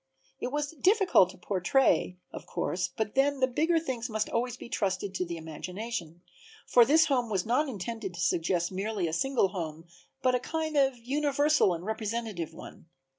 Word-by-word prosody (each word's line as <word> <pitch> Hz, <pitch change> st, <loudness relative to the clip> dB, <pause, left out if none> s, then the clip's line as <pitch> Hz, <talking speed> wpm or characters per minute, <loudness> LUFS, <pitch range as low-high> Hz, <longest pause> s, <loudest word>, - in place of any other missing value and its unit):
It 250 Hz, -, -3 dB
was 290 Hz, 0 st, -2 dB
difficult 365 Hz, -, +4 dB
to -, -, -12 dB
portray, 185 Hz, +1 st, +1 dB, 0.2 s
of -, -, -8 dB
course, -, -, -1 dB
but 220 Hz, -2 st, -1 dB
then 275 Hz, +1 st, +2 dB
the 260 Hz, -, +5 dB
bigger 315 Hz, +7 st, +1 dB
things 260 Hz, -7 st, -3 dB
must 215 Hz, -1 st, -1 dB
always 240 Hz, +1 st, -1 dB
be -, -, -9 dB
trusted 195 Hz, -5 st, -2 dB
to 180 Hz, -, -1 dB
the 170 Hz, -1 st, -5 dB
imagination, 175 Hz, +2 st, -6 dB, 0.4 s
for 240 Hz, -1 st, +6 dB
this 315 Hz, +5 st, +5 dB
home 255 Hz, -6 st, +1 dB
was 195 Hz, -4 st, 0 dB
not 260 Hz, +6 st, +1 dB
intended 215 Hz, -3 st, -5 dB
to -, -, -8 dB
suggest 175 Hz, +1 st, +1 dB
merely 195 Hz, -1 st, -2 dB
a 160 Hz, -, -4 dB
single 245 Hz, +2 st, +2 dB
home 165 Hz, -4 st, -5 dB, 0.4 s
but 255 Hz, -1 st, +3 dB
a 250 Hz, -, +2 dB
kind 315 Hz, +4 st, -3 dB
of 270 Hz, -3 st, +3 dB
universal 285 Hz, 0 st, +2 dB
and 170 Hz, +2 st, -8 dB
representative 220 Hz, -5 st, -3 dB
one. -, -, -12 dB
230 Hz, 175 wpm, -29 LUFS, 185-270 Hz, 0.4 s, for